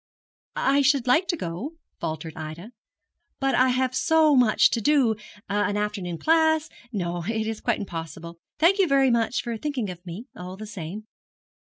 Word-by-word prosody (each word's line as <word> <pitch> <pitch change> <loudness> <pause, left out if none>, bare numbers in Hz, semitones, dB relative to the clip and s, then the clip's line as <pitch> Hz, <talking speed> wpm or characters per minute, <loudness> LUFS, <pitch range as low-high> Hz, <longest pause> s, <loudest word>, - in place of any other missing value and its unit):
'I 275 +1 +3
should 275 -2 +3
like 320 +9 +3
to 340 - 0
go,' 180 - -5 0.3
faltered 160 -1 -4
Ida, 160 +7 -7 0.7
'but 270 0 +1
I 255 0 +4
have 255 0 +1
so 315 +1 +4
much 245 -4 +5
to 230 - 0
do 260 -3 +3 0.3
an 205 0 0
afternoon 205 -5 -3
class 315 - +3 0.2
no, 175 -5 -3
it 220 0 -1
is 220 -1 -4
quite - - 0
impossible. 170 -3 -7 0.2
Thank 360 +5 +4
you 385 - +4
very 270 -3 +4
much 235 +1 +1
for 235 -1 -3
thinking 250 -6 -3
of 175 -1 -11
me, 185 +6 -8
all 180 +1 -8
the 215 - -7
same. 205 0 -7
225 Hz, 170 wpm, -25 LUFS, 180-275 Hz, 0.7 s, much